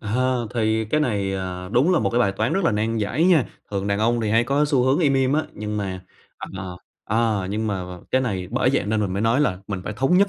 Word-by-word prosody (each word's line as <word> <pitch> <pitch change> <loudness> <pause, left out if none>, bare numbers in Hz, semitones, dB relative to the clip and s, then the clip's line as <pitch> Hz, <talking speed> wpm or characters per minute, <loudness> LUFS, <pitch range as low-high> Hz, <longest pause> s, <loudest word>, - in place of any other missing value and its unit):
Ờ, 125 +2 0
thì 110 -1 +1
cái 150 +8 0
này, 100 -8 0
ờ, 90 -1 -4
đúng 145 +10 +4
là 175 - +4
một 100 -3 0
cái 120 - +1
bài 100 -4 +2
toán 110 +4 -1
rất 195 -2 0
là - - +3
nan 110 +2 0
giải 115 +10 0
nha. 170 -8 +5 0.3
Thường 100 -1 -2
đàn 100 0 0
ông 115 +2 +2
thì 110 -1 -1
hay 115 +2 +3
có 140 +4 +2
xu 140 -4 +2
hướng 135 +4 +3
im 145 -5 +3
im 135 0 +2
á, 155 +1 +2
nhưng 105 0 -4
mà 95 -2 -3 0.6
ờ, 90 -1 -6 0.3
ờ, 110 -3 0
nhưng 110 +2 -1
mà 95 -3 -2
mà 90 0 -8
cái 130 - +3
này 95 -7 -2
bởi 125 +2 +2
vậy 135 - +1
nên 110 0 0
mình 100 -3 -1
mới 100 +3 -1
nói 115 +5 +3
là 95 -11 +1
mình 95 -3 -4
phải - - -3
thống 135 - +3
nhất 200 0 +4
110 Hz, 275 wpm, -23 LUFS, 100-130 Hz, 0.6 s, nha